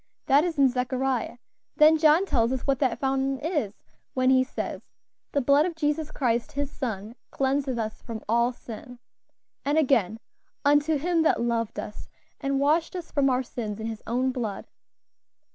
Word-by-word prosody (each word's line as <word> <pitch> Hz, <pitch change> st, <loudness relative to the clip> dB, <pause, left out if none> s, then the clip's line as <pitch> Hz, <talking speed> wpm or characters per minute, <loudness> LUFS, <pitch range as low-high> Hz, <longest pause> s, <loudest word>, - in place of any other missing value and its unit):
That 280 Hz, +3 st, +5 dB
is 340 Hz, -3 st, -2 dB
in 275 Hz, -1 st, +6 dB
Zechariah; 255 Hz, 0 st, -1 dB, 0.4 s
then 310 Hz, +1 st, +6 dB
John 315 Hz, +4 st, +5 dB
tells 235 Hz, -9 st, +1 dB
us 260 Hz, -1 st, -1 dB
what 275 Hz, -2 st, +1 dB
that 255 Hz, -5 st, +1 dB
fountain 270 Hz, 0 st, 0 dB
is 290 Hz, -, -3 dB, 0.3 s
when 255 Hz, 0 st, +3 dB
he 260 Hz, 0 st, +5 dB
says, 260 Hz, -, -5 dB, 0.5 s
'The 285 Hz, -, +1 dB
blood 280 Hz, +5 st, +4 dB
of 345 Hz, -, -5 dB
Jesus 305 Hz, 0 st, -1 dB
Christ 245 Hz, +1 st, -1 dB
His 285 Hz, 0 st, -3 dB
Son 220 Hz, -5 st, -4 dB, 0.2 s
cleanseth 270 Hz, -1 st, 0 dB
us 220 Hz, -1 st, -4 dB
from 225 Hz, -3 st, -7 dB
all 235 Hz, +2 st, +2 dB
sin;' 245 Hz, +1 st, -10 dB, 0.7 s
and 290 Hz, +2 st, +1 dB
again, 230 Hz, -, +2 dB, 0.5 s
'Unto 290 Hz, +2 st, +4 dB
Him 335 Hz, +3 st, +1 dB
that 320 Hz, -, +3 dB
loved 230 Hz, -2 st, -1 dB
us, 210 Hz, -, -8 dB, 0.3 s
and 275 Hz, 0 st, -1 dB
washed 315 Hz, +5 st, +2 dB
us 350 Hz, -2 st, -6 dB
from 275 Hz, -2 st, +2 dB
our 255 Hz, 0 st, +1 dB
sins 220 Hz, -4 st, -5 dB
in 220 Hz, -, -4 dB
His 225 Hz, -1 st, -5 dB
own 255 Hz, +3 st, +1 dB
blood.'" 225 Hz, -6 st, -4 dB
265 Hz, 170 wpm, -26 LUFS, 235-295 Hz, 0.7 s, in